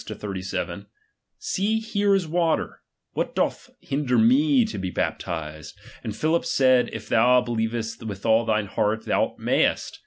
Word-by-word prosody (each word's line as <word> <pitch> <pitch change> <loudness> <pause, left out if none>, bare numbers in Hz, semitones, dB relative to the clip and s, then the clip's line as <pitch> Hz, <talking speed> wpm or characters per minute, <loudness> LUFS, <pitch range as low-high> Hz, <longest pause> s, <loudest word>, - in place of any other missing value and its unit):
36 - - -8
37: 95 -2 -4 0.5
See, 210 +4 -1
here 205 -2 +1
is 185 -4 0
water; 165 0 0 0.3
what - - -2
doth - - -1
hinder 135 -2 0
vie 265 +3 +4
to 215 - -5
be 95 -1 -3
bapti&edf 80 -4 -4 0.3
And 110 - -4
Philip 160 +7 +1
said. 130 -2 +3
If' 115 -1 -7
thou 125 +2 +5
be 120 - -5 0.2
Uevest 115 0 -5
with 100 -2 -7
all 115 0 +4
thine 110 -2 0
heart, 105 +2 -1
thou - - 0
mayest. - - 0
125 Hz, 155 wpm, -24 LUFS, 105-180 Hz, 0.5 s, thou